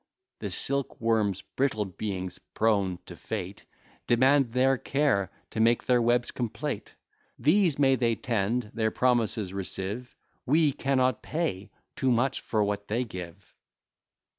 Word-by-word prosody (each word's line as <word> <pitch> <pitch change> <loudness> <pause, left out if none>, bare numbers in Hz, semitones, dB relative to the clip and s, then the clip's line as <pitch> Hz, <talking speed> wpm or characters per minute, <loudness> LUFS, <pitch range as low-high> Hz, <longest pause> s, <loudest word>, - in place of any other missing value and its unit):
The - - -4
silk 140 -1 -2
worms 110 -4 +1
(brittle 125 -6 -1
beings!) 95 -1 -5 0.2
prone 100 -5 +2
to - - -10
fate, 100 -3 -6 0.4
Demand 130 +1 +4
their 130 +1 +4
care, 135 -9 +1 0.2
to - - -4
make 115 +1 +4
their 125 -1 +3
webs 120 +1 +2
complete: 120 -3 -4 0.4
These 170 0 +3
may 135 -2 +4
they 115 -2 +1
tend, 115 0 -1
their 110 -1 +1
promises 110 -5 +1
receive; 100 +5 -4 0.3
We 150 +2 +3
cannot 130 -3 +1
pay 130 - -3 0.3
too 130 - +1
much 125 +2 +1
for 110 -2 0
what 105 0 -2
they 115 +4 0
give! 90 -3 -9
115 Hz, 135 wpm, -28 LUFS, 100-130 Hz, 0.4 s, Demand